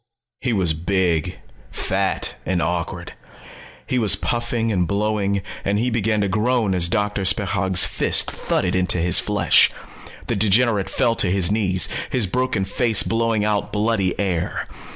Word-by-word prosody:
He 130 Hz, -, -2 dB
was 95 Hz, -7 st, +1 dB
big, 85 Hz, -1 st, -1 dB, 0.3 s
fat -, -, -1 dB
and 90 Hz, -1 st, -1 dB
awkward. 85 Hz, -1 st, -3 dB, 0.7 s
He 125 Hz, -, -1 dB
was 110 Hz, -4 st, +3 dB
puffing 120 Hz, -1 st, -2 dB
and 90 Hz, -4 st, 0 dB
blowing, 100 Hz, -1 st, -1 dB, 0.2 s
and 100 Hz, +1 st, 0 dB
he 120 Hz, +3 st, 0 dB
began 110 Hz, -1 st, 0 dB
to 100 Hz, -, 0 dB
groan 110 Hz, +1 st, 0 dB
as 85 Hz, -2 st, +3 dB
Doctor 105 Hz, -1 st, -1 dB
Spechaug's 95 Hz, -2 st, +2 dB
fists -, -, +2 dB
thudded 90 Hz, -1 st, -2 dB
into 90 Hz, -1 st, +1 dB
his 85 Hz, 0 st, +3 dB
flesh. -, -, +3 dB, 0.6 s
The -, -, -2 dB
degenerate 105 Hz, 0 st, +2 dB
fell 120 Hz, -3 st, +1 dB
to 95 Hz, -, +2 dB
his 95 Hz, -1 st, +2 dB
knees, 95 Hz, -5 st, +2 dB, 0.2 s
his 125 Hz, -4 st, 0 dB
broken 115 Hz, -1 st, -1 dB
face 110 Hz, +2 st, +1 dB
blowing 115 Hz, -2 st, 0 dB
out 105 Hz, -1 st, -1 dB
bloody 105 Hz, -3 st, -1 dB
air. 90 Hz, -4 st, -2 dB
100 Hz, 150 wpm, -21 LUFS, 95-115 Hz, 0.7 s, was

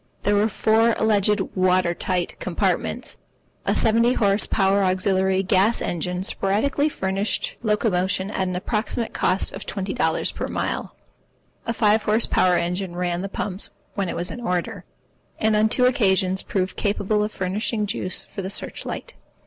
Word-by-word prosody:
There 205 Hz, -, +2 dB
were 205 Hz, +2 st, +3 dB
four 225 Hz, +2 st, +3 dB
alleged 210 Hz, -1 st, +2 dB
water 185 Hz, -2 st, +2 dB
tight 180 Hz, 0 st, -2 dB
compartments. -, -, -1 dB, 0.5 s
A -, -, +2 dB
seventy 230 Hz, +2 st, +3 dB
horse 200 Hz, -3 st, +2 dB
power 195 Hz, 0 st, +2 dB
auxiliary 190 Hz, 0 st, +2 dB
gas 195 Hz, +4 st, +3 dB
engine 180 Hz, +2 st, -2 dB
sporadically 245 Hz, +11 st, 0 dB
furnished 195 Hz, -4 st, -2 dB
locomotion 200 Hz, -3 st, 0 dB
at 190 Hz, -3 st, -1 dB
an 180 Hz, -, -3 dB
approximate 220 Hz, +4 st, -2 dB
cost 185 Hz, +2 st, +1 dB
of 195 Hz, -, -7 dB
twenty 195 Hz, -1 st, -3 dB
dollars -, -, 0 dB
per -, -, -4 dB
mile. -, -, -3 dB, 0.7 s
A -, -, +1 dB
five 215 Hz, -1 st, +3 dB
horse 215 Hz, +2 st, +2 dB
power 180 Hz, -1 st, +3 dB
engine 175 Hz, +1 st, -2 dB
ran 175 Hz, 0 st, -1 dB
the 195 Hz, -, -4 dB
pumps 195 Hz, 0 st, -3 dB, 0.2 s
when 195 Hz, -3 st, -2 dB
it -, -, -3 dB
was 175 Hz, -, -1 dB
in 245 Hz, -, -7 dB
order, 180 Hz, -6 st, -2 dB, 0.5 s
and 220 Hz, 0 st, +2 dB
on 215 Hz, +1 st, +3 dB
two 250 Hz, +2 st, +3 dB
occasions 190 Hz, -6 st, +2 dB
proved 185 Hz, -1 st, -2 dB
capable 210 Hz, 0 st, 0 dB
of 210 Hz, -, -2 dB
furnishing 210 Hz, +4 st, -1 dB
juice 185 Hz, -2 st, -2 dB
for -, -, -7 dB
the 190 Hz, -, -4 dB
search 200 Hz, -, -4 dB
light. -, -, -6 dB
195 Hz, 160 wpm, -23 LUFS, 185-215 Hz, 0.7 s, were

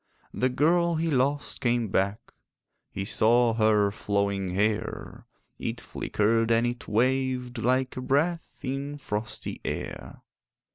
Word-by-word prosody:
The 130 Hz, -, +1 dB
girl 170 Hz, +6 st, +2 dB
he 160 Hz, 0 st, 0 dB
lost 140 Hz, +2 st, 0 dB
came 120 Hz, -4 st, +1 dB
back: 100 Hz, +2 st, -1 dB, 0.6 s
He 95 Hz, -, -4 dB
saw 115 Hz, +3 st, +3 dB
her 110 Hz, -2 st, +3 dB
flowing 100 Hz, -2 st, -1 dB
hair; 105 Hz, +2 st, -2 dB, 0.3 s
It -, -, -3 dB
flickered 115 Hz, +2 st, 0 dB
and 115 Hz, +1 st, +3 dB
it 120 Hz, 0 st, -4 dB
waved 125 Hz, +1 st, 0 dB
Like 130 Hz, +2 st, +1 dB
a 130 Hz, -, -4 dB
breath 150 Hz, +6 st, +1 dB
in 140 Hz, +2 st, -3 dB
frosty 110 Hz, -5 st, -4 dB
air. -, -, -5 dB
120 Hz, 125 wpm, -27 LUFS, 105-135 Hz, 0.6 s, saw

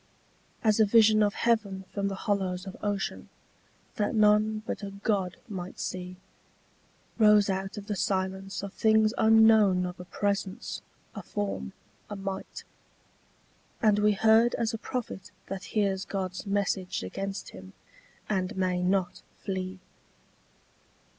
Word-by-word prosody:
As 215 Hz, -1 st, +3 dB
a 220 Hz, -, +7 dB
vision 215 Hz, 0 st, +5 dB
of 205 Hz, 0 st, +2 dB
heaven 205 Hz, -5 st, 0 dB
from 200 Hz, -1 st, -1 dB
the 195 Hz, -, -3 dB
hollows 190 Hz, -2 st, -1 dB
of 190 Hz, -, -7 dB
ocean, 205 Hz, -2 st, -3 dB, 0.7 s
that 210 Hz, +2 st, 0 dB
none 215 Hz, 0 st, +3 dB
but -, -, -4 dB
a 200 Hz, -, -5 dB
god 195 Hz, -2 st, -1 dB
might 185 Hz, -5 st, -7 dB
see, 180 Hz, 0 st, -5 dB, 1.0 s
Rose 210 Hz, -2 st, +6 dB
out 190 Hz, +2 st, -4 dB
of 205 Hz, -, -6 dB
the 210 Hz, -1 st, -3 dB
silence 190 Hz, 0 st, -2 dB
of 200 Hz, -, -6 dB
things 220 Hz, 0 st, +3 dB
unknown 220 Hz, -4 st, +5 dB
of 180 Hz, 0 st, -6 dB
a 180 Hz, -, -8 dB
presence, 200 Hz, +3 st, -2 dB, 0.3 s
a -, -, -6 dB
form, 205 Hz, -1 st, -4 dB, 0.4 s
a 205 Hz, -, -5 dB
might, 195 Hz, -1 st, -6 dB, 1.2 s
And 210 Hz, -2 st, +3 dB
we 210 Hz, 0 st, +4 dB
heard 220 Hz, +3 st, +4 dB
as 230 Hz, -1 st, -1 dB
a 225 Hz, -, -4 dB
prophet 215 Hz, -7 st, -5 dB, 0.2 s
that 195 Hz, -1 st, -6 dB
hears 195 Hz, -2 st, +1 dB
God's 190 Hz, 0 st, -4 dB
message 195 Hz, -, -1 dB
against 195 Hz, -, -5 dB
him, 95 Hz, 0 st, -12 dB, 0.5 s
and 190 Hz, 0 st, -1 dB
may 185 Hz, -1 st, 0 dB
not 185 Hz, 0 st, 0 dB, 0.2 s
flee. 190 Hz, -1 st, -3 dB
200 Hz, 135 wpm, -28 LUFS, 190-215 Hz, 1.2 s, a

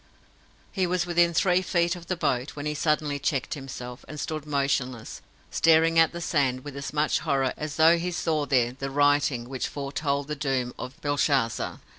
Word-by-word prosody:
He 190 Hz, -3 st, 0 dB
was 180 Hz, 0 st, 0 dB
within 175 Hz, -1 st, +3 dB
three 180 Hz, +2 st, +3 dB
feet 175 Hz, -1 st, +1 dB
of 170 Hz, -1 st, -11 dB
the 185 Hz, -, -1 dB
boat, 140 Hz, -5 st, -1 dB
when 145 Hz, 0 st, -6 dB
he 150 Hz, -, -1 dB
suddenly 150 Hz, -1 st, 0 dB
checked 135 Hz, -2 st, -1 dB
himself, 125 Hz, -3 st, -8 dB
and 150 Hz, -, -8 dB
stood 155 Hz, -1 st, -4 dB
motionless, 135 Hz, -4 st, -1 dB, 0.3 s
staring 165 Hz, 0 st, +4 dB
at 165 Hz, -, +5 dB
the 170 Hz, -, -6 dB
sand 135 Hz, -6 st, 0 dB
with 145 Hz, -2 st, -8 dB
as 140 Hz, 0 st, -5 dB
much 150 Hz, 0 st, +1 dB
horror 135 Hz, -2 st, 0 dB
as 150 Hz, -1 st, -5 dB
though 165 Hz, +2 st, +5 dB
he 180 Hz, +2 st, -2 dB
saw 160 Hz, -4 st, -1 dB
there 125 Hz, -4 st, +2 dB
the 135 Hz, +2 st, -5 dB
Writing 145 Hz, -3 st, +2 dB
which 130 Hz, 0 st, -3 dB
foretold 140 Hz, 0 st, -2 dB
the 150 Hz, -, -3 dB
doom 135 Hz, -3 st, -1 dB
of 130 Hz, -, -7 dB
Belshazzar. 140 Hz, -5 st, 0 dB
145 Hz, 185 wpm, -26 LUFS, 135-165 Hz, 0.3 s, at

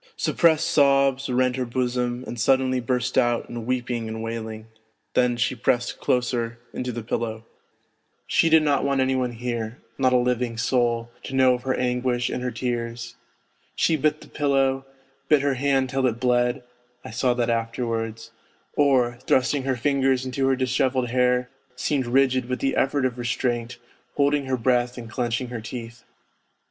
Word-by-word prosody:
Sup -, -, -1 dB
pressed 165 Hz, -1 st, +4 dB
sobs 140 Hz, -3 st, +3 dB
rent 125 Hz, 0 st, +1 dB
her 130 Hz, -, 0 dB
bosom 125 Hz, 0 st, -1 dB
and 120 Hz, -, -6 dB
suddenly 130 Hz, +1 st, +2 dB
burst 125 Hz, +1 st, 0 dB
out 120 Hz, -1 st, +1 dB
in 120 Hz, -1 st, -7 dB
weeping 120 Hz, -2 st, -2 dB
and 110 Hz, 0 st, -5 dB
wailing, 110 Hz, -1 st, -5 dB, 0.5 s
then 125 Hz, -1 st, +2 dB
she 125 Hz, +2 st, +1 dB
pressed 125 Hz, 0 st, 0 dB
closer 120 Hz, -2 st, 0 dB, 0.2 s
into 125 Hz, 0 st, -3 dB
the 120 Hz, -1 st, -5 dB
pillow: 110 Hz, 0 st, -3 dB, 0.8 s
she 165 Hz, -, +3 dB
did 160 Hz, -1 st, +6 dB
not 145 Hz, -2 st, +2 dB
want 140 Hz, -1 st, +1 dB
any 130 Hz, 0 st, +2 dB
one 125 Hz, -2 st, -1 dB
here, 115 Hz, -1 st, -4 dB, 0.2 s
not 130 Hz, -1 st, +3 dB
a 125 Hz, -, +5 dB
living 125 Hz, -1 st, 0 dB
soul, 120 Hz, 0 st, 0 dB
to 135 Hz, -, -6 dB
know 130 Hz, -1 st, +5 dB
of 125 Hz, -, -3 dB
her 130 Hz, 0 st, -1 dB
anguish 125 Hz, 0 st, 0 dB
and -, -, -3 dB
her 125 Hz, -, -1 dB
tears. 120 Hz, 0 st, -4 dB, 0.6 s
She 165 Hz, -, +2 dB
bit 155 Hz, 0 st, 0 dB
the -, -, -13 dB
pillow, 135 Hz, -2 st, 0 dB, 0.4 s
bit 150 Hz, -2 st, +4 dB
her 140 Hz, -1 st, +2 dB
hand 135 Hz, -1 st, +1 dB
till 135 Hz, -1 st, +1 dB
it 115 Hz, -1 st, -2 dB
bled 125 Hz, +1 st, +1 dB, 0.4 s
(I -, -, -7 dB
saw 125 Hz, +2 st, +1 dB
that 120 Hz, -1 st, 0 dB
afterwards), 115 Hz, -1 st, -3 dB, 0.4 s
or, 125 Hz, -4 st, +2 dB
thrusting 130 Hz, +2 st, +2 dB
her 135 Hz, -1 st, +1 dB
fingers 135 Hz, 0 st, +1 dB
into 135 Hz, +1 st, -1 dB
her 135 Hz, -, +3 dB
dishevelled 130 Hz, -1 st, 0 dB
hair 125 Hz, 0 st, +2 dB, 0.3 s
seemed 130 Hz, 0 st, -1 dB
rigid 130 Hz, 0 st, +2 dB
with 125 Hz, -, -1 dB
the 135 Hz, -, -1 dB
effort 135 Hz, 0 st, +1 dB
of 125 Hz, -1 st, -2 dB
restraint, 120 Hz, 0 st, -2 dB, 0.4 s
holding 145 Hz, 0 st, +2 dB
her 130 Hz, -1 st, 0 dB
breath 125 Hz, +1 st, +1 dB
and 120 Hz, -2 st, -7 dB
clenching 120 Hz, +1 st, -2 dB
her 120 Hz, -2 st, -5 dB
teeth. 115 Hz, 0 st, -8 dB
125 Hz, 170 wpm, -24 LUFS, 120-130 Hz, 0.8 s, did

